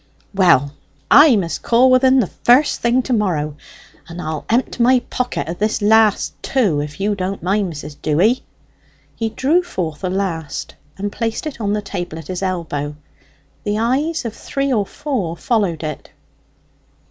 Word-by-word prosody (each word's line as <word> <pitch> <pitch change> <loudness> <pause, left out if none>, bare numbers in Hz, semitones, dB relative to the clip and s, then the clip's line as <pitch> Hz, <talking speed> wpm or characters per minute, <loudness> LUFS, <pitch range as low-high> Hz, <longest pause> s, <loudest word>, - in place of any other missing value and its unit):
"Well, 170 -8 +4 0.4
I 290 -3 +8
must 175 -5 -2
call 250 +2 +4
with 255 +1 +4
en 260 0 +5
the - - 0
first 250 - +2
thing 240 +2 +2
to 255 - -2
morrow. 160 -9 0 0.5
And 170 +1 -8
I'll 155 -3 -4
empt 245 +2 0
my 250 +1 +4
pocket 250 -8 -2
o' 165 - -2
this 215 +5 -1
last 215 0 +3
too, 210 - +1
if 150 +2 -6
you 205 +2 +1
don't 190 -1 -4
mind, 195 0 0
Mrs. 145 -1 -8
Dewy." 185 +12 +2 0.7
He 225 -1 -2
drew 285 +10 +2
forth 180 - -5
a 185 - 0
last, 180 -5 -3 0.2
and 200 +1 -3
placed 225 +6 -3
it 290 -6 -6
on 205 -1 0
a 210 - -3
table 175 -5 -5
at 160 -3 -10
his 185 0 -4
elbow. 160 -6 -3 0.7
The 205 0 -1
eyes 275 +7 0
of 225 - -3
three 275 -1 -2
or 205 -4 0
four 205 - -3
followed 200 -9 0
it. 155 -2 -6
205 Hz, 170 wpm, -19 LUFS, 170-245 Hz, 0.7 s, I